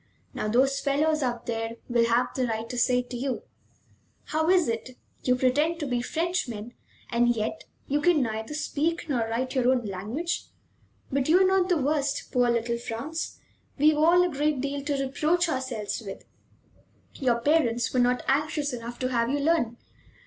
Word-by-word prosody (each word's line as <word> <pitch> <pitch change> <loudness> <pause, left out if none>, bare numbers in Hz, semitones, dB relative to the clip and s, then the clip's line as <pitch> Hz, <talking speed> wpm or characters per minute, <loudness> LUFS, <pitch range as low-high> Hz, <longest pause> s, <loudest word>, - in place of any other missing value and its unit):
Now - - -3
those 270 +5 +3
fellows 300 +3 +1
out 240 -3 -2
there 225 0 -3
will 235 -1 +3
have 235 +2 +2
the 255 -2 0
right 225 0 -3
to 250 - -5
say 250 +1 +3
to 245 0 -8
you: 255 +1 -3 0.8
'How 315 +2 0
is 365 -2 +4
it; 230 +2 -4 0.2
you 250 - +2
pretend 290 +7 +1
to 300 - -2
be 245 -3 -1
Frenchmen, 250 - -2 0.4
and 240 0 +3
yet 215 0 -3 0.2
you 290 +2 +1
can 315 -3 +4
neither 220 +4 -4
speak 315 +3 -1
nor 270 -5 0
write 255 +3 -2
your 255 -2 +2
own 250 -3 +1
language?' 215 - -3 0.7
But 275 +1 0
you 350 +3 +6
are - - +6
not 380 -1 +2
the 355 - +3
worst, 285 0 -1
poor 245 -2 +3
little 235 0 0
Franz. 245 +8 -5 0.4
We've 300 +2 +5
all 340 +4 +5
a 360 - +1
great 295 0 +1
deal 280 +1 -2
to 285 -2 0
reproach 315 +6 +1
ourselves 255 -8 -3
with. 195 -2 -8 0.9
"Your 245 -3 +1
parents 240 -4 +2
were 255 - +2
not 245 0 +2
anxious 290 0 0
enough 240 0 -6
to 255 - 0
have 235 -2 +1
you 285 - +1
learn. 285 -6 +1
260 Hz, 180 wpm, -27 LUFS, 235-300 Hz, 0.9 s, you